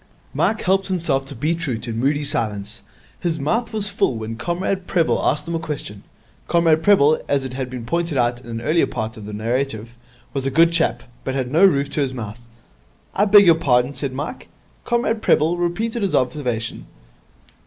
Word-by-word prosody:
Mike 220 - 0
helped 190 +1 +2
himself 160 -8 0
to 140 +1 -7
beetroot 150 -3 -2
in 115 -1 -3
moody 145 +4 +1
silence. 105 -5 -3 0.4
His 165 -3 -2
mouth 225 - -1
was 215 -2 +1
full 200 -10 0
when 110 0 -5
Comrade 180 +7 -2
Prebble 170 -4 +1
asked 150 +2 0
him 170 - -3
a 165 - 0
question. 145 -10 -5 0.5
Comrade 165 -2 +3
Prebble, 160 -5 +4
as 140 -1 +1
has 130 0 -4
been 125 -2 -7
pointed 170 +3 -1
out 120 0 +1
in 125 - -15
an 115 0 -4
earlier 155 +7 +2
part 110 +1 -4
of 105 -3 -9
the - - -6
narrative, 115 +1 -2 0.4
was 135 -1 -2
a - - +2
good 165 +4 +4
chap, 120 -7 +1 0.2
but 130 - -3
had 130 -2 -2
no 165 +6 +4
roof 140 -7 +4
to 150 - -1
his 130 -2 -1
mouth. 110 -1 -6 0.7
'I 200 - +2
beg 205 0 +7
your 170 - +8
pardon?' 125 -4 +2
said 140 0 -3
Mike. 145 - -6 0.4
Comrade 235 -2 0
Prebble 160 -2 +3
repeated 220 +7 -1
his 195 -2 0
observation. 125 -3 -2
140 Hz, 185 wpm, -21 LUFS, 125-170 Hz, 0.7 s, your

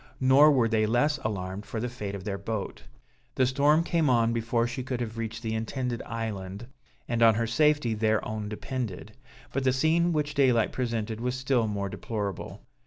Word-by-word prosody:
Nor 135 +3 +6
were 125 -5 +3
they 110 -1 +1
less 145 +7 +2
alarmed 95 -2 -4
for 110 - -5
the 120 - -2
fate 105 -5 -5
of 95 - -7
their 100 -1 -3
boat. 105 0 -5 0.5
The 130 - +3
storm 145 +5 +3
came 165 -4 +1
on 115 -2 +3
before 115 0 0
she 120 +2 -4
could 125 -1 -3
have 115 -2 -4
reached 115 +1 -5
the 110 -1 -2
intended 120 +2 -3
island, 105 -2 -5 0.4
and 115 -1 -1
on 115 -2 +6
her 115 +1 0
safety 145 0 +2
their 110 0 +1
own 110 -1 -4
depended. 110 -2 -5 0.4
But 135 - -1
the 130 - +3
scene 160 +6 +2
which 150 -2 -1
daylight 130 -6 +3
presented 115 -3 -3
was 125 +1 -1
still 130 -3 +1
more 100 -2 -2
deplorable. 100 -1 -5
115 Hz, 185 wpm, -27 LUFS, 110-130 Hz, 0.5 s, Nor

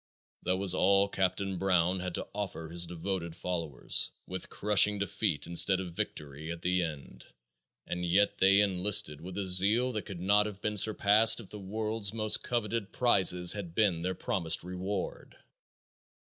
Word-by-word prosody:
That 90 +1 -1
was 95 -1 +2
all 100 +2 +3
Captain 95 -1 -2
Brown 90 -1 +1
had 90 -1 -5
to - - -5
offer 95 -5 -5
his 85 +1 -2
devoted 85 0 -5
followers, 85 -5 -1 0.2
with 95 0 -6
crushing 105 0 +3
defeat 95 -7 -2
instead 90 +2 +4
of 90 -3 -7
victory 75 0 -6
at 85 0 -8
the 90 0 +1
end, 70 -7 -7 0.6
and 90 0 -5
yet 95 +4 +1
they 100 +1 +5
enlisted 95 -5 +2
with 90 +3 -9
a 100 - -2
zeal 100 +7 +3
that 110 -3 -5
could 100 -5 -8
not 100 +3 +2
have 100 -2 -9
been 105 0 -3
surpassed 105 +2 +4
if 110 - -11
the 105 - -8
world's 110 +1 -2
most 110 -1 +2
coveted 115 -3 -3
prizes 95 -7 +3
had 95 -5 -8
been 100 -7 +1
their 90 +2 -3
promised 85 -10 0
reward. 90 +2 -6
95 Hz, 165 wpm, -29 LUFS, 90-105 Hz, 0.6 s, they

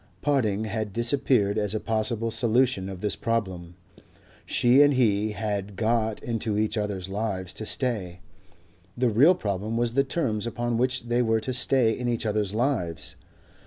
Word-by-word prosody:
Parting 110 -8 +1
had 110 -1 -4
disappeared 120 -4 +1
as 105 0 -1
a - - 0
possible 115 +1 -1
solution 115 -3 +1
of 95 -2 -8
this 105 - -1
problem. 95 -7 -3 0.7
She 125 +3 +4
and 145 -1 +5
he 110 -4 +2
had 105 -2 -3
got 110 0 0
into 115 -2 -1
each 110 +1 0
other's 100 -4 -3
lives 95 -2 -3
to 110 +2 -3
stay: 100 -9 -1 0.8
the 125 0 +2
real 145 - +5
problem 105 - -3
was 120 -1 0
the 135 +2 +3
terms 120 -7 -2
upon 120 0 -2
which 125 0 0
they 120 +1 0
were 115 -2 +2
to 130 +3 -3
stay 125 -1 +3
in 125 +2 -3
each 120 -1 -1
other's 105 -1 -1
lives. 100 - -2
110 Hz, 160 wpm, -26 LUFS, 105-120 Hz, 0.8 s, and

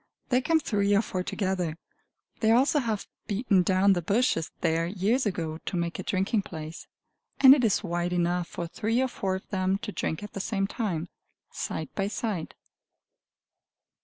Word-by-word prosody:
They 250 -1 +3
come 320 +4 +3
three 205 -7 +1
or 205 - +3
four 185 -4 -3
together. 180 -4 -2 0.6
They 220 - +2
also 265 +6 +4
have 225 -6 -2 0.2
beaten 205 -2 +2
down 190 +2 +4
the 175 - 0
bushes 195 -3 +1
there 165 +1 +1
years 210 +7 +1
ago, 165 -5 -3
to 180 - -4
make 170 0 -2
a - - -3
drinking 195 +3 +1
place; 160 -3 -8 0.5
and 265 -1 +10
it 275 -3 +2
is 215 -2 +2
wide 175 -1 -1
enough 175 0 0
for 170 - -5
three 225 +7 -1
or 260 - +2
four 195 -6 -2
of 190 - -7
them 190 0 +1
to 210 +1 -6
drink 160 -2 -3
at 210 - -8
the - - -4
same 195 0 -1
time, 195 -6 -2 0.4
side 155 -2 -4
by 195 -1 -1
side. 205 -5 -3
195 Hz, 175 wpm, -27 LUFS, 175-220 Hz, 0.6 s, and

